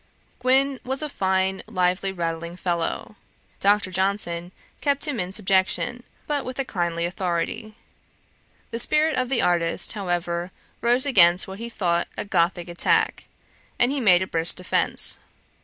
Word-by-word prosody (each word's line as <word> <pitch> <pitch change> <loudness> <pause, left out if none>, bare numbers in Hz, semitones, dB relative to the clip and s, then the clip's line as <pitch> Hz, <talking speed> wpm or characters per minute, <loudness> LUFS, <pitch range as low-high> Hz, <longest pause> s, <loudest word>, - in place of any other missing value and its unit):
Gwyn 265 +1 +2
was 265 +3 -3
a 305 - -3
fine 190 -4 0
lively 185 -1 0
rattling 170 -1 -4
fellow. 175 +3 -3 0.4
Dr. 200 -1 +2
Johnson 185 -2 0 0.3
kept 285 +1 +1
him 280 -6 -2
in 180 0 -2
subjection, 195 +4 +1 0.2
but 290 -2 -1
with 255 0 -6
a 275 - -1
kindly 170 -5 -2
authority. 185 +5 -3 1.0
The 230 - -3
spirit 305 +4 +3
of 255 -1 -1
the 265 -3 +1
artist, 170 0 +1
however, 175 -3 -2 0.3
rose 245 +3 +3
against 180 -9 +5
what 190 +1 -8
he 235 +1 -5
thought 175 -6 0
a - - -3
Gothick 175 -2 0
attack, 175 0 +1 0.5
and 245 +2 +3
he 285 - -1
made 185 -5 +5
a - - -6
brisk 165 -1 +1
defence. 180 0 +1
190 Hz, 145 wpm, -24 LUFS, 175-240 Hz, 1.0 s, against